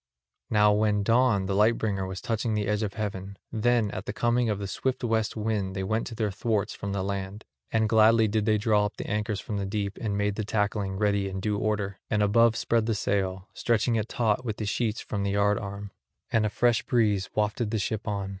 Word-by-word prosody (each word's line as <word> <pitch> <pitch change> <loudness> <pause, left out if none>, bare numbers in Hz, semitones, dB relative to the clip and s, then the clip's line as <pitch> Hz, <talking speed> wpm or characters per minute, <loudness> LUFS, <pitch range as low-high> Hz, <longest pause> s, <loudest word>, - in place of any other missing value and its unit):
Now 105 -1 +4
when 105 -1 +2
dawn 115 -3 +3
the 95 - -1
light 105 +4 +4
bringer 95 -3 -1
was 95 -1 -6
touching 115 -2 -1
the 105 -1 0
edge 105 +1 0
of 105 -3 -3
heaven, 100 -2 -4
then 115 -1 +1
at - - -6
the - - -3
coming 120 +1 +1
of 105 - 0
the 100 - -4
swift 130 +7 -2
west 110 -2 0
wind 105 -3 -1
they 95 - -2
went 110 +4 -1
to 115 - -7
their 110 -2 -1
thwarts 105 +1 -1
from 100 - -5
the 100 -1 -1
land; 100 +1 -4 0.3
and 110 -1 +2
gladly 110 0 +5
did 105 0 0
they 110 -1 +4
draw 105 -1 +2
up - - -13
the - - -5
anchors 105 -1 -1
from 105 - -4
the 100 - -2
deep 100 0 -3
and 105 -3 -1
made 105 0 0
the 110 - -1
tackling 105 -2 -1
ready 100 -1 +1
in 95 0 -4
due 105 +1 -1
order; 100 -3 -1
and 105 -1 +2
above 115 +2 +4
spread 115 -1 +1
the 115 - +1
sail, 95 -2 -1
stretching 115 0 +1
it 110 0 -1
taut 115 0 0
with 110 -4 -3
the 110 - -3
sheets 110 +1 -1
from 100 - -4
the 100 - 0
yard 100 0 +2
arm. 100 0 -7 0.4
And 110 -1 +2
a - - -2
fresh 120 +1 +2
breeze 105 -5 +1
wafted 105 +1 0
the 110 - -1
ship 110 +1 -3
on. 100 -2 -2
105 Hz, 230 wpm, -27 LUFS, 100-110 Hz, 0.4 s, gladly